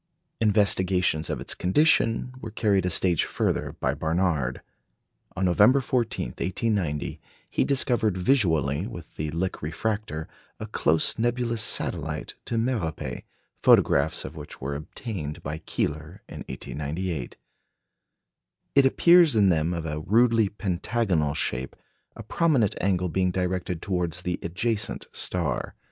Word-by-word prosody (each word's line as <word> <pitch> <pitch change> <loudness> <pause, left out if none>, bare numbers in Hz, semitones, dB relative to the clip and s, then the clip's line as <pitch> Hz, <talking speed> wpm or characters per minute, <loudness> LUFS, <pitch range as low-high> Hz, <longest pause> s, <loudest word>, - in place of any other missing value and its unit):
Investigations 95 -6 +2
of - - -2
its - - -1
condition 120 - +2
were 115 - -6
carried 100 -4 +1
a - - +1
stage 85 -1 +2
further - - -1
by - - 0
Barnard. 80 -6 -1 0.7
On 95 - 0
November 105 +9 +5
14, 120 -3 -1
1890, 90 -5 -2 0.3
he - - 0
discovered 120 -7 +2
visually 85 - +2
with 85 -9 -10
the 75 0 -2
Lick 90 +4 -3
refractor 80 -1 -3 0.3
a - - -4
close 80 +7 +1
nebulous 120 -1 0
satellite - - 0
to 115 - -2
Merope, 85 - -2 0.4
photographs - - +4
of 70 +4 -8
which 75 -2 -9
were 70 +2 -4
obtained 75 - -6
by 75 +2 -4
Keeler 75 +6 -3
in - - -9
1898. 75 -1 -4 1.4
It 140 -1 +5
appears 170 0 +5
in 100 -3 +5
them 80 -1 +1
of 85 -2 -3
a 75 -1 -3
rudely 115 +4 +3
pentagonal 95 -5 -1
shape, 65 -1 -2 0.4
a 115 - -8
prominent 120 - +2
angle 90 -2 +1
being 90 +2 +1
directed 90 -1 -2
towards 90 -2 -2
the 90 -1 -2
adjacent 100 +4 -2
star. - - -2
95 Hz, 125 wpm, -26 LUFS, 80-115 Hz, 1.4 s, November